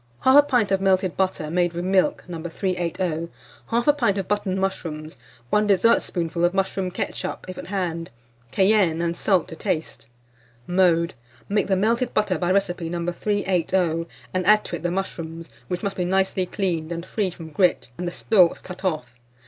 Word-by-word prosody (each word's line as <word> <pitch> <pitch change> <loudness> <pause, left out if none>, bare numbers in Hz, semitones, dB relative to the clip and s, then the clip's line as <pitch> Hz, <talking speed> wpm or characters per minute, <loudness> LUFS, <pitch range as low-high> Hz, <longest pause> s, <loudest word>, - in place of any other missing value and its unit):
1/2 285 +3 +7
pint 245 -8 +2
of 195 0 +2
melted 190 -2 +2
butter, 185 -5 -1
made 175 0 +1
with 175 +1 -3
milk, 195 +11 +2
No. 170 -3 -6
380; 170 -1 -2 0.4
1/2 240 +6 +3
pint 205 -6 +2
of 195 -2 -2
button 195 -2 -1
mushrooms, 160 -5 -3 0.4
1 210 0 +3
dessertspoonful 180 -4 +2
of 175 +2 +2
mushroom 190 -1 0
ketchup, 180 - -4
if 185 - -6
at - - -8
hand; 175 -4 -2 0.4
cayenne 190 -1 +3
and 170 0 -1
salt 185 -1 +2
to 160 - -7
taste. 160 - -3 0.6
Mode. 175 -2 +3 0.3
Make 205 +1 +1
the 195 - +2
melted 230 +5 +1
butter 200 -5 +1
by 175 - 0
recipe 180 -3 0
No. 170 0 -3
380, 180 -4 0 0.3
and 185 0 0
add 210 0 +5
to - - -3
it - - -7
the 175 - -1
mushrooms, 165 -5 -5 0.2
which 180 +6 -3
must 200 -1 -2
be 180 - 0
nicely 190 0 +1
cleaned, 175 -5 -2
and 170 0 -4
free 200 0 -1
from 165 -2 -10
grit, 150 -7 +2
and 180 - -2
the - - -2
stalks 180 -1 +3
cut 180 +1 -10
off. 125 -9 -3
185 Hz, 175 wpm, -23 LUFS, 170-195 Hz, 0.6 s, 1/2